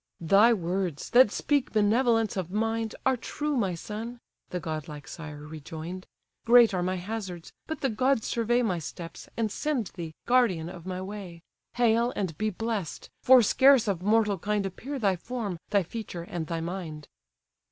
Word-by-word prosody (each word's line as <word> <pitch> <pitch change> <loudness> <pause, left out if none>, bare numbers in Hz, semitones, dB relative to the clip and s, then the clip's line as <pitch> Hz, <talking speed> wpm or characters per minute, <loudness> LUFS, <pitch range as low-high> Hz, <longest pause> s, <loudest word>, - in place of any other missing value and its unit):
"Thy 200 +7 +6
words, 180 -5 -2
that 245 -2 +7
speak 285 +5 0
benevolence 225 +1 +3
of 185 -3 -3
mind, 225 +2 -1
Are 265 0 +4
true, 295 +4 -3
my 195 -8 0
son! 225 +7 -6 0.3
(the 180 - -3
godlike 155 -3 -6
sire 150 -3 -8
rejoin'd:) 160 +4 -7 0.4
Great 235 -2 +7
are 180 - 0
my 185 +1 0
hazards; 185 -2 -6
but 315 -2 -5
the 270 - +1
gods 255 +1 +1
survey 240 +1 +1
My 185 -7 0
steps, 165 +2 -8
and 220 -2 0
send 265 - -2
thee, 165 -4 -7
guardian 225 -10 +2
of 180 -1 -10
my 185 0 -4
way. 190 -4 -8 0.3
Hail, 235 0 +3
and 185 -6 -2
be 215 0 +1
bless'd! 215 -4 -4
For 255 -1 +7
scarce 265 +1 +5
of 190 -4 0
mortal 210 -1 +2
kind 210 +2 -1
Appear 255 +9 -5
thy 200 -7 +1
form, 210 -3 -4
thy 200 -2 +3
feature, 180 -2 -6
and 170 -2 -5
thy 165 -1 -2
mind." 165 -3 -5
205 Hz, 165 wpm, -28 LUFS, 175-230 Hz, 0.4 s, that